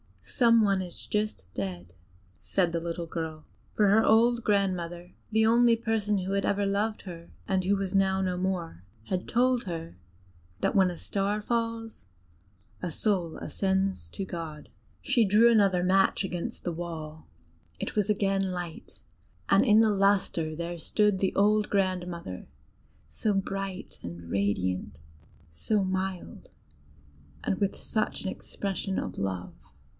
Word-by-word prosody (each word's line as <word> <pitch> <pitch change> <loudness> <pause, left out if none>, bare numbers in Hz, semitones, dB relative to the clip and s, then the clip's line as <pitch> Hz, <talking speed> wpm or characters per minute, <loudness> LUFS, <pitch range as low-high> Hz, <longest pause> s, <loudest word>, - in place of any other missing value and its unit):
"Some 230 -3 +4
one 195 -2 +2
is 180 -2 -5
just 210 - -2
dead!" 90 -3 -5 0.5
said 180 -3 0
the 170 - -1
little 170 0 -4
girl; 160 -2 -5 0.3
for 210 -2 +4
her 220 +2 +5
old 235 +2 +4
grandmother, 180 -4 -1 0.2
the 220 0 +3
only 235 +1 +5
person 220 -3 0
who 185 +1 -3
had 200 0 +1
loved 205 +2 0
her, 170 -3 -9 0.2
and 190 -1 +1
who 200 +2 +3
was 195 -1 -3
now 190 -1 +3
no 185 -1 0
more, 180 - -3 0.3
had 185 -1 -2
told 250 +1 +2
her, 165 - -6 0.6
that - - +1
when 190 -2 +5
a 175 - -6
star 200 +3 -1
falls, 230 - -3 0.7
a 180 - -2
soul 175 -1 -1
ascends 190 - -1
to 195 - -5
God. 165 -4 -7 0.3
She 235 - +3
drew 215 +4 +6
another 195 -5 +4
match 190 +2 +3
against 180 -2 -4
the 175 - -1
wall: 160 -2 -6 0.5
it - - -4
was 210 -1 +1
again 195 -2 +1
light, 175 -2 -7 0.5
and 195 +2 +5
in 220 -4 +6
the 220 -1 +4
lustre 195 -5 +2
there 170 +1 -4
stood 210 +4 +2
the 190 - 0
old 210 +1 +3
grandmother, 180 - -2 0.6
so 215 - -1
bright 195 0 -4
and 85 -1 -8
radiant, 95 -7 -1 0.5
so 205 - 0
mild, 190 -1 -4 0.9
and 190 - -1
with 200 -1 0
such 215 -1 -2
an 190 - -2
expression 195 0 -4
of 95 - -4
love. 95 -2 -3
190 Hz, 145 wpm, -28 LUFS, 170-210 Hz, 0.9 s, drew